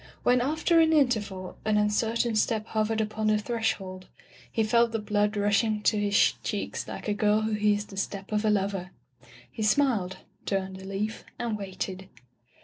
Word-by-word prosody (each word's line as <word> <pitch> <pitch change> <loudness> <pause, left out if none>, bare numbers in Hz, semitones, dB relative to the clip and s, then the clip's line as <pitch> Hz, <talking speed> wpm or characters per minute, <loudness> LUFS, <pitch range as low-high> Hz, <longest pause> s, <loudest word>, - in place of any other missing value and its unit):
When, 245 0 +4
after 315 +5 +2
an 320 0 +5
interval, 210 - 0
an 215 -1 +2
un 210 0 +2
certain 230 +2 0
step 215 0 +1
hovered 220 0 0
upon 215 0 -1
the 215 0 +4
threshold, 210 -5 -3 0.4
he 225 - +1
felt 235 +1 +3
the - - +1
blood 210 0 0
rushing 210 +1 +1
to 215 - +3
his 205 0 +3
cheeks - - -3
like - - -7
a 210 - +1
girl 210 +1 +2
who 220 0 -1
hears 210 -1 +1
the 195 - -12
step 195 +1 -4
of 210 0 +1
a 215 - +2
lover. 195 -3 0 0.6
He - - -7
smiled, 215 -5 +2 0.3
turned 190 -1 -2
a - - -10
leaf, 205 +3 -3
and 235 -2 -2
waited. 190 -1 -5
210 Hz, 175 wpm, -27 LUFS, 200-225 Hz, 0.6 s, an